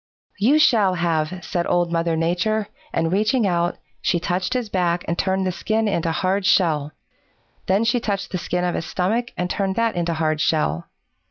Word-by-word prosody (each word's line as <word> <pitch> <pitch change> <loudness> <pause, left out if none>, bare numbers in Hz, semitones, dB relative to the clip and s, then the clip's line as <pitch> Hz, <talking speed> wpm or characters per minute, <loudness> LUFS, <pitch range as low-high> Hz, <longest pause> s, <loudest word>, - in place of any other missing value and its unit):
"'You 255 +9 +4
shall 215 -11 +4
have,' 170 +1 -1
said 175 -2 -2
Old 175 -1 +1
Mother 165 -1 0
Nature, 180 +6 0 0.2
and 165 +1 0
reaching 215 +4 +2
out, 175 -1 0 0.2
she 175 - +1
touched 180 +6 -1
his 250 -3 -1
back 175 -3 0
and 170 - 0
turned 190 +1 0
the 185 - 0
skin 220 +5 -1
into 170 -5 0
hard 190 +4 0
shell. 155 -6 +2 0.7
Then 195 +4 +3
she 240 +2 +2
touched 200 -4 -3
the 185 - -2
skin 180 +1 -2
of 175 -1 0
his 165 - -3
stomach 225 +7 -1
and 180 - -1
turned 190 +1 -1
that 230 0 +1
into 170 -1 -1
hard 155 -1 0
shell. 85 - 0
180 Hz, 185 wpm, -22 LUFS, 170-205 Hz, 0.7 s, You